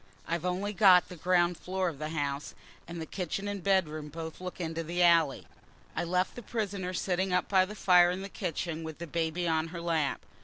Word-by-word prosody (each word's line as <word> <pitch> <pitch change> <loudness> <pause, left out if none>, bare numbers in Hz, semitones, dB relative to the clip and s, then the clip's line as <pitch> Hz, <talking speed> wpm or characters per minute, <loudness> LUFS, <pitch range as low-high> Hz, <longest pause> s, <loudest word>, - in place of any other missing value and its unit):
I've 170 +1 -2
only 190 +3 -1
got 190 -3 +6
the 180 - -8
ground 175 0 +2
floor 185 0 -1
of 155 -5 -4
the 155 0 -3
house, 145 -2 -3 0.3
and 170 0 -6
the 160 - -4
kitchen 190 +3 -4
and 200 -3 -4
bedroom 155 -6 +1
both 160 +2 -7
look 185 0 -6
into 165 -1 -3
the 175 +2 0
alley. 165 -5 +4 0.5
I - - -1
left 180 +2 0
the 245 - -8
prisoner 200 -5 -3
sitting 185 0 -1
up 180 - +1
by 190 -2 +4
the 210 +3 -8
fire 180 -3 +5
in 185 +2 -3
the - - -5
kitchen 170 -4 -3
with 160 -1 -7
the 170 - -6
baby 170 +2 -1
on 160 0 +1
her 170 +1 -7
lap. 165 -4 0
175 Hz, 215 wpm, -30 LUFS, 160-185 Hz, 0.5 s, got